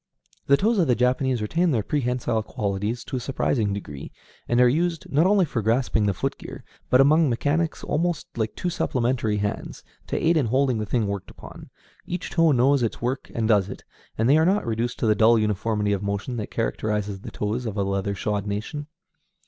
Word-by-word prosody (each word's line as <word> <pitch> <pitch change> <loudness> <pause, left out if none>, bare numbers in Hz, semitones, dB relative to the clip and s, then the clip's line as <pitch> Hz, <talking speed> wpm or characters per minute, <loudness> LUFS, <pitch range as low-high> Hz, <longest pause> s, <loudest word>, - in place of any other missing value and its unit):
The 140 - +5
toes 220 +4 +2
of 170 - +3
the 125 - +3
Japanese 125 -1 +1
retain 170 +10 +1
their 115 -8 +1
prehensile 125 -4 -1
qualities 105 +2 -3
to 130 - -4
a - - -2
surprising 120 -4 0
degree, 75 -9 -6 0.4
and 120 - +2
are 125 - +7
used, 165 +5 0
not 155 +5 +4
only 200 -2 +4
for 125 -6 -2
grasping 110 -1 +1
the 100 - +2
foot - - -3
gear, - - -9 0.3
but 125 - +5
among 150 +3 +5
mechanics 145 +7 -1
almost 170 +1 -1
like 110 -1 -2
two 180 - -2
supplementary 120 -8 0
hands, 105 0 -4 0.2
to - - -2
aid 165 +1 +2
in 140 -6 +2
holding 130 0 +1
the 105 - -3
thing 115 0 +1
worked 100 -2 -4
upon. - - -12 0.4
Each 180 +1 -4
toe 165 -2 +4
knows 135 +1 +3
its 115 - -1
work 125 +3 -3
and 115 -1 0
does 105 -3 +3
it, 95 - -8 0.3
and 115 - +2
they 140 +4 +5
are - - +4
not 195 +4 +2
reduced 115 +1 -2
to - - +1
the 110 - +4
dull 110 +2 +5
uniformity 105 0 0
of 100 - -2
motion 100 +5 -3
that 105 - -4
characterizes 105 - -2
the - - -8
toes 110 +4 -3
of 105 -1 -5
a 100 - +1
leather 100 +1 -1
shod 105 +1 -2
nation. 110 +9 -4
120 Hz, 205 wpm, -24 LUFS, 105-140 Hz, 0.4 s, are